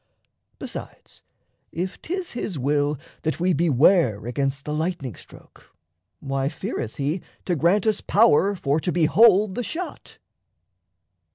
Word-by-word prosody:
Besides, - - -9 0.5
if 180 +3 -4
'tis 365 +1 -4
his 205 -8 -4
will 145 +2 0 0.2
that 160 +1 -2
we 180 +1 +2
beware 140 - +3
Against 135 +2 -2
the 150 - -3
lightning 155 - -2
stroke, - - -17 0.4
why 135 0 -2
feareth 115 -6 -5
he 150 +6 -2 0.2
To 180 - 0
grant 175 +7 +2
us 215 -2 +1
power 200 -2 +4
for 145 -3 0
to 175 - -2
behold 195 +4 +4
the 245 - -3
shot? 350 +8 -7
165 Hz, 125 wpm, -23 LUFS, 140-195 Hz, 0.5 s, power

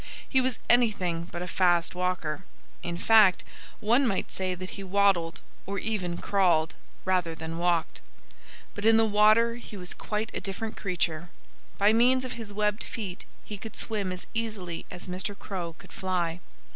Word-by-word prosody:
He 265 - +3
was 255 -1 0
anything 190 -9 +2
but 175 0 -4
a - - -5
fast 175 -2 +2
walker. 180 -2 -2 0.4
In 170 0 -3
fact, 210 -1 +5 0.4
one 240 +5 +3
might 195 -4 -1
say 185 -1 -2
that 185 +1 -7
he 195 - -7
waddled, 190 -4 +2 0.3
or 200 +1 -3
even 185 -5 -2
crawled, 175 -6 +2 0.3
rather 180 -3 +1
than 160 +1 -5
walked. 170 -1 0 0.7
But 205 - -6
in 225 +1 +6
the 225 - +5
water 215 +2 +4
he 230 -3 -10
was 180 -1 -4
quite 215 +1 -3
a - - -3
different 215 +3 -4
creature. 175 -3 -2 0.5
By 205 +2 +5
means 255 +3 +4
of 255 - -4
his 225 -3 -7
webbed 210 +1 0
feet 195 -6 -6 0.2
he 205 -2 -7
could 220 +2 -8
swim 205 -4 -1
as 185 0 -6
easily 210 -7 -3
as 175 - -8
Mr. 185 +3 -3
Crow 175 -4 -5
could - - -15
fly. 175 -3 -1
190 Hz, 170 wpm, -28 LUFS, 175-220 Hz, 0.7 s, in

